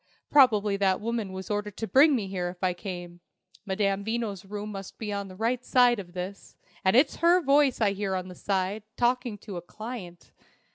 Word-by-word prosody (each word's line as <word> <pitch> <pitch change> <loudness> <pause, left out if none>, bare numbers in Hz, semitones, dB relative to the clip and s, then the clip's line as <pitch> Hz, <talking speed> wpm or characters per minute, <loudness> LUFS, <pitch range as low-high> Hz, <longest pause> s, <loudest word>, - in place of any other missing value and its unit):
"Probably 215 -8 +5
that 190 -2 +2
woman 225 -3 -3
was 190 +2 -6
ordered 210 -1 -3
to 225 - -2
bring 280 +5 +5
me 220 -5 -1
here 180 -2 -2
if 180 +1 -11
I 185 -1 +2
came. 175 -1 -7 0.5
Madame 195 0 0
Veno's 220 -3 -3
room 205 +2 -6
must 195 -2 -8
be 210 -2 -4
on 200 -1 -3
the 185 - -11
right 235 +4 -1 0.4
of 175 -3 -9
this, 185 +2 -7 0.3
and 190 +3 +3
it's 275 +3 +4
her 345 +2 +5
voice 280 -4 +3
I 210 -3 +3
hear 195 -1 -2
on 185 0 -3
that 180 - -10
side, 195 +1 -1 0.2
talking 245 -2 +1
to 200 -2 -8
a - - -5
client. 195 -2 -9
205 Hz, 195 wpm, -27 LUFS, 190-230 Hz, 0.5 s, Probably